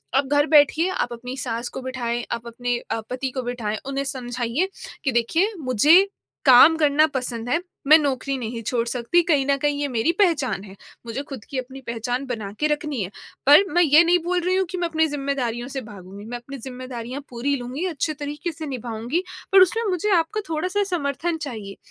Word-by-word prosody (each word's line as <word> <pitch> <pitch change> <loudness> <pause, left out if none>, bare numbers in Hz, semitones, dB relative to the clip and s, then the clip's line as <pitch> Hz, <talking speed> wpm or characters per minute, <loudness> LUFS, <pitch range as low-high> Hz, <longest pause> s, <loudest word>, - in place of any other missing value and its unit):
अब 270 0 +2
घर 290 +1 +4
बैठिए 305 +3 +5
आप 245 -9 -2
अपनी 250 +2 -7
सास 240 -2 -3
को - - -7
बिठाएँ, 240 -2 -3
आप 235 0 -4
अपने 245 +1 -2
अ, 225 - -1
पति 260 +1 -2
को 260 0 -4
बिठाएँ 235 -3 -3
उन्हें 275 0 -2
समझाइए 250 +4 -2 0.4
कि 270 - +1
देखिए, 320 - +1
मुझे 295 - +5 0.4
काम 270 +5 +8
करना 305 0 +4
पसंद 245 -2 -3
है 335 +7 +1 0.2
मैं 310 +2 +9
नौकरी 275 -2 -1
नहीं 230 -1 -4
छोड़ 235 +1 -1
सकती, 245 +8 +2
कहीं 295 -5 +2
न 280 - +3
कहीं 290 -1 0
ये 290 - 0
मेरी 255 +6 +1
पहचान 290 - +2
है। 195 -1 -11 0.3
मुझे 235 +5 -4
ख़ुद 255 -6 -7
की 270 - -4
अपनी 260 +1 -6
पहचान 245 +3 -2
बना 220 -6 -4
के 300 - +3
रखनी 295 -5 -1
है, 180 - -3 0.4
पर 295 +7 +8
मैं 350 - +4
ये 310 0 +7
नहीं 350 +1 +4
बोल 360 0 +1
रही 365 +2 0
हूँ 380 - +2
कि 370 - -4
मैं 345 -1 0
अपनी 320 -1 +2
ज़िम्मेदारियों 275 -5 -2
से 275 0 -4
भागूँगी, 200 -3 -11
मैं 240 +2 -5
अपनी 270 +3 -9
ज़िम्मेदारियाँ 255 0 -6
पूरी 255 +4 -1
लूँगी 255 +7 -5
अच्छे 315 -2 -2
तरीके 295 +3 -5
से 315 0 -7
निभाऊँगी 245 +4 -3 0.3
पर 390 - +8
उसमें 450 +5 +2
मुझे 370 +3 0
आपका 335 +6 0
थोड़ा-सा 365 +6 -1
समर्थन 320 0 -1
चाहिए। 215 -9 -6
270 Hz, 200 wpm, -23 LUFS, 240-310 Hz, 0.4 s, मैं